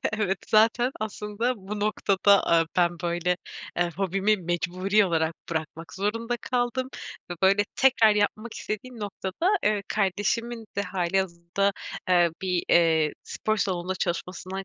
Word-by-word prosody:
Evet, 200 -3 0
zaten 225 +3 +4
aslında 215 +3 -2
bu 205 +1 -6
noktada, 200 -1 +3
aaa, 165 -1 +4
ben, 175 -1 +4
böyle, 175 +1 0 0.4
eee, 175 0 +1
hobimi 195 +2 +1
mecburi 185 +3 +1
olarak 160 -2 0 0.2
bırakmak 160 0 -5
zorunda 230 +5 -1
kaldım 250 +1 -1 0.4
ve, - - -2
böyle, 195 +2 +5
tekrar 235 -5 +5
yapmak 215 +2 -1
istediğim 230 +3 -6
noktada, 205 - -1
eee, 210 -1 +2
kardeşimin 215 +4 -1
de 200 - +1
hâlihazırda, 185 0 -1 0.4
eee, 175 -2 +4
bir, 180 -2 0
eee, 160 -3 +4
spor 215 0 -2
salonunda 185 -2 -1
çalışmasından 185 +1 -4
195 Hz, 125 wpm, -26 LUFS, 175-215 Hz, 0.4 s, böyle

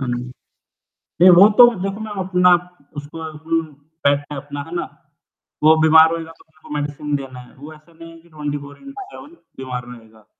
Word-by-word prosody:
हाँ 135 - -4
जी। 120 0 -3 1.0
नहीं 185 - +8
वो 195 +4 +8
तो 245 - +11 0.2
देखो 195 +2 -4
मैं 215 - -7
अपना 180 -1 +3 0.5
उसको 145 +2 -9
उम, 160 +1 -3 0.4
बैठता 145 +1 0
है 140 - -5
अपना 145 +1 -8
है 165 - -9
ना? - - -2 0.8
वो 155 +1 +6
बीमार 160 +1 +6
होएगा 165 -1 -5
तो - - -21
उसको 155 0 -20
मेडिसिन 145 0 -3
देना 135 -2 -7
है, 125 - -15
वो 145 +4 -12
ऐसा 155 +2 -21
नहीं 165 0 -13
है 165 - -15
कि 170 - -24
ट्वेंटी 150 -2 -5
फोर 145 0 -12
इन 275 0 -12
टू 400 - -9
सेवेन 385 -6 -12
वो - - -33 0.2
बीमार 125 -2 -6
में 125 0 -11
होएगा। 110 -1 -22
155 Hz, 215 wpm, -19 LUFS, 140-165 Hz, 1.0 s, तो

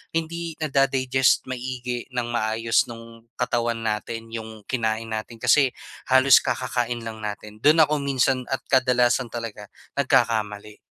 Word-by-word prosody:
hindi 165 0 -3
nada-digest 135 -3 +2
maigi 125 -1 -5
ng 120 -1 -1
maayos 115 0 +1
nung 115 0 -12
katawan 120 -1 0
natin 115 +1 -3
'yong 110 -1 -7
kinain 115 -2 -2
natin 110 +2 -5
kasi 140 +4 +4 0.4
halos 130 0 +7
kakakain 120 -2 -2
lang 110 -1 -7
natin. 105 0 -7
Doon 155 +2 +6
ako 150 0 -1
minsan 130 -2 +1
at 135 - -2
kadalasan 125 -1 +3
talaga 115 -3 -6 0.3
nagkakamali. 105 -5 +1
120 Hz, 125 wpm, -24 LUFS, 115-130 Hz, 0.4 s, halos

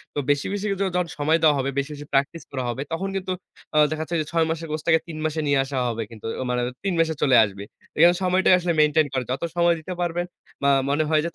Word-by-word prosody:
তো - - 0
বেশি, 145 0 +2
বেশি, 205 0 -3
ও - - -4 0.2
যখন 180 -1 +1
সময় 155 +3 +3
দেওয়া 150 -2 +6
হবে, 135 +1 -1
বেশি, 140 +2 -3
বেশি, 145 0 -9
প্র্যাকটিস 140 +5 0
করা 130 -2 -3
হবে 120 +3 -3
তখন 190 +4 -2
কিন্তু 190 -1 -3 0.4
আ - - +3
দেখা 155 0 -2
যাচ্ছে 170 - -4
যে - - -4
৬ 165 -1 +2
মাসের 165 0 -3
কোর্সটাকে 160 +1 +2
৩ 160 -2 -7
মাসে 155 0 -1
নিয়ে 140 -1 +3
আসা 135 0 -5
হবে 115 -1 -3
কিন্তু। 110 -2 -12 0.2
অ - - -1
মানে 125 0 0 0.2
৩ 195 -2 0
মাসে 160 -1 +2
চলে 130 -3 +4
আসবে। 100 -1 -4 0.3
এইখানে 170 +3 +6
সময়টাই 185 0 +4
আসলে 175 -1 0
মেইনটেইন 150 0 +4
করে। 130 -1 0
যত 130 - -3
সময় 170 0 +3
দিতে 170 +4 -6
পারবেন 175 0 -1 0.4
বা 140 - +4 0.2
মনে 145 +2 +2
হয় 155 -1 +3
যে - - -1
155 Hz, 250 wpm, -24 LUFS, 140-170 Hz, 0.4 s, দেওয়া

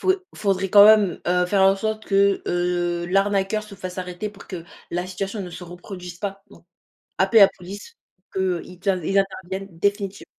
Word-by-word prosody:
faut 375 - +3 0.2
faudrait 195 -2 0
quand 205 0 +9
même, 210 -5 +5
heu, 180 0 +2
faire 195 +1 +2
en 195 0 +6
sorte 215 +2 -3
que, 200 0 +3
heu, 175 -1 -1
l'arnaqueur 195 +2 +1
se 210 -2 -12
fasse 185 -1 -7
arrêter 180 +3 -4
pour 200 -1 -15
que 175 -3 -7 0.3
la 175 +1 -1
situation 195 +3 -4
ne 180 - -7
se 180 +1 -9
reproduise 180 0 -9
pas. 195 -1 -5
Donc - - -18 0.5
appeler 195 +4 +5
la 195 - +9
police 200 - -10 0.2
pour 185 - -46
qu'eux, 185 -3 -1
ils 180 -1 -13
int 185 -3 +1
ils 195 +5 +1
interviennent 195 0 -3
définitive 200 +1 -1
195 Hz, 190 wpm, -23 LUFS, 180-200 Hz, 0.5 s, quand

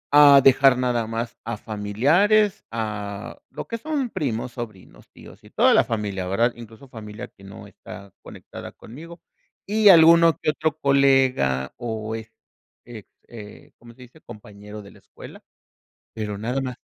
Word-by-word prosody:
a 145 -1 +8
dejar 135 -1 +5
nada 120 -3 -1
más 115 +1 -5
a 115 -1 -5
familiares", 150 - +1
a 105 -1 -6
lo - - -9
que 230 - -5
son 280 -2 -3
primos, 120 -3 -4
sobrinos, 110 -7 -11
tíos - - -16
y - - -17
toda - - +3
la - - +4
familia, 100 -4 -4
¿verdad? 115 +6 0
Incluso 115 +3 -14
familia 110 0 -10
que 100 - -22
no 95 0 -12
está 100 -1 -13
conectada - - -11
conmigo 165 +8 -13 0.4
y 210 0 +3
alguno 165 -1 +6
que 155 - -1
otro 155 0 -3
colega 135 - +1
o 110 -2 -5
est 115 0 -10 0.5
eh 115 -3 -11 0.2
eh, 105 -3 -13
¿cómo 120 0 -16
se 130 - -15
dice? 130 +6 -19
compañero 105 0 -12
de 100 - -15
la - - -19
escuela, - - -14 0.7
pero 105 -2 -5
nada 125 +6 -3
más. 125 -2 -5
120 Hz, 155 wpm, -22 LUFS, 105-140 Hz, 0.7 s, a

